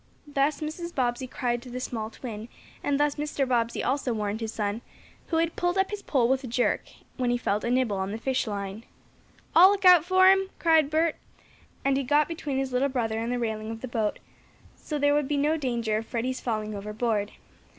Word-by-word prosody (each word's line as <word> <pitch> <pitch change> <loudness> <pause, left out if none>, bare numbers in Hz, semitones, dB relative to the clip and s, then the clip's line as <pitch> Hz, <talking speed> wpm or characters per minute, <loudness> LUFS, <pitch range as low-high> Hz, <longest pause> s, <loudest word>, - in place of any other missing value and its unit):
Thus 290 +1 0
Mrs. 340 +3 -5
Bobbsey 250 0 0
cried 240 -2 -2
to 250 - -11
the 250 +1 -5
small 225 -4 -4
twin, 225 -1 -8 0.3
and 285 -1 +1
thus 295 -1 +1
Mr. 290 -2 -1
Bobbsey 235 -2 0
also 260 -1 0
warned 210 0 -2
his 220 -1 -3
son, 210 +1 -2 0.5
who 325 - 0
had 330 0 +1
pulled 350 +1 0
up 385 +1 +1
his 415 -1 -4
pole 255 -10 +2
with 265 +2 +1
a - - -5
jerk, 245 +1 +1 0.4
when 250 -2 0
he 245 - +2
felt 210 -3 -1
a 235 - -1
nibble 245 -5 +1
on 190 0 -2
the 215 - -3
fish 260 +1 -1
line. 200 +1 -4 0.7
"I'll 360 +3 +9
look 400 -1 0
out 360 -3 +8
for 375 +2 +6
him!" 385 0 +2
cried 320 -3 +4
Bert, 315 +1 +1 0.7
and 275 -1 +3
he 275 - 0
got 290 +3 +3
between 300 -5 -3
his 265 -1 -2
little 265 +3 +2
brother 225 -4 -1
and 230 +2 -2
the 245 - 0
railing 220 -2 -3
of 225 0 -6
the 260 - -5
boat, 220 -3 -1 0.6
so 300 - -5
there 290 0 +3
would 295 -2 +1
be 290 - 0
no 295 +3 +2
danger 235 -7 -1
of 220 0 -5
Freddie's 255 +2 -2
falling 215 -3 -2
overboard. 210 +1 -2
255 Hz, 215 wpm, -27 LUFS, 225-295 Hz, 0.7 s, I'll